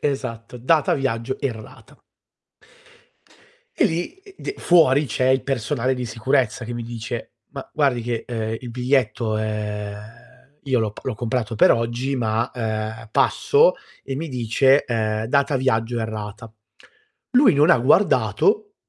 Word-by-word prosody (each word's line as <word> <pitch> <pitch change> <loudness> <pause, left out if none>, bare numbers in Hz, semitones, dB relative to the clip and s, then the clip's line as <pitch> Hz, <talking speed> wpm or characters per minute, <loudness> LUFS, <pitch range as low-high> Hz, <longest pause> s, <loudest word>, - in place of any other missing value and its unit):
Esatto, 125 -4 -4
data 150 +5 +2
viaggio 130 -2 -2
errata. 115 -6 -7 1.7
E - - +2
lì 170 - -3
e 385 0 -18
d - - -4
fuori 150 -5 +4
c'è 130 +2 0
il 130 0 +3
personale 130 0 -1
di 125 -1 -4
sicurezza 120 +1 0
che 120 - -5
mi 120 - -4
dice: 115 -2 -6 0.2
"Ma - - -8
guardi 135 -5 +1
che, 115 -1 -3
uhm, 110 -2 -3
il 125 - -8
biglietto 125 -3 0
è" 105 -1 -3 0.7
io 130 -2 +2
l'ho 110 -2 -1
p - - -12
l'ho 130 - -2
comprato 115 0 -2
per - - +6
oggi, 120 +4 -1
ma, 115 -1 -1
ehm, 110 -1 -4
passo 460 - +3 0.3
e 135 - -4
mi 160 +4 -4
dice: 130 +2 +2
"Ehm, 110 -2 -1
data 140 +3 +1
viaggio 120 -2 0
errata". 110 0 -6 0.8
Lui 255 - +5
non 150 +4 +4
ha 170 - +6
guardato 410 - +2
120 Hz, 145 wpm, -22 LUFS, 110-135 Hz, 1.7 s, per